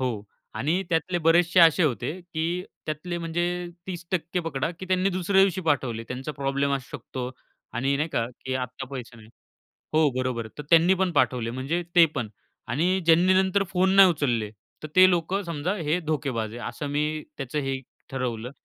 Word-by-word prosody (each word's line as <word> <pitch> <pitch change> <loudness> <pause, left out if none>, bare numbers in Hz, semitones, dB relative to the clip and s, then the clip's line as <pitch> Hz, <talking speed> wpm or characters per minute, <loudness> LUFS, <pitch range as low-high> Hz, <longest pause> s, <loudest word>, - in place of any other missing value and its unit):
हो. 120 -5 -2 0.3
आणि 170 +7 0
त्यातले 175 +1 0
बरेचशे 170 +2 +4
असे 165 +2 +6
होते 125 -2 0
की 170 +1 -3 0.2
त्यातले 165 +3 -3
म्हणजे 170 +1 -1 0.4
30% 175 -1 -3
पकडा 160 -1 -2
की 185 - -7
त्यांनी 185 +1 +2
दुसऱ्या 185 +1 +2
दिवशी 190 -1 +2
पाठवले. 135 -9 0
त्यांचा 130 +4 -5
प्रॉब्लेम 140 0 -1
असू 135 -2 -5
शकतो 125 -1 -6 0.4
आणि 135 +4 0
नाही 150 +3 -1
का 115 -7 -1 0.2
की 130 - -2
आता 125 +1 -4
पैसे 125 -3 -7
नाही 110 -1 -15 0.7
हो, 155 -1 +5
बरोबर 125 -2 -1
आहे 110 +4 -14
तर 150 - -4
त्यांनी 170 +3 +6
पण 185 -1 0
पाठवले 125 -5 +1
म्हणजे 135 +8 -2
ते 170 -1 +8
पण 120 -6 -2 0.4
आणि 180 +9 +1
ज्यांनी 170 +3 +5
नंतर 190 +1 +3
फोन 190 +1 +2
नाही 195 -1 +9
उचलले 120 -10 0 0.3
तर 155 - -5
ते 185 0 +9
लोकं 180 +3 0
समजा 170 +1 -2
हे 160 0 0
धोकेबाज 135 -9 -2
आहे, 120 - -7
असं 135 +5 -6
मी 150 +1 -1 0.2
त्याचं 135 +1 -3
हे 135 -1 -2 0.3
ठरवलं. 125 -3 -3
155 Hz, 175 wpm, -26 LUFS, 130-175 Hz, 0.7 s, नाही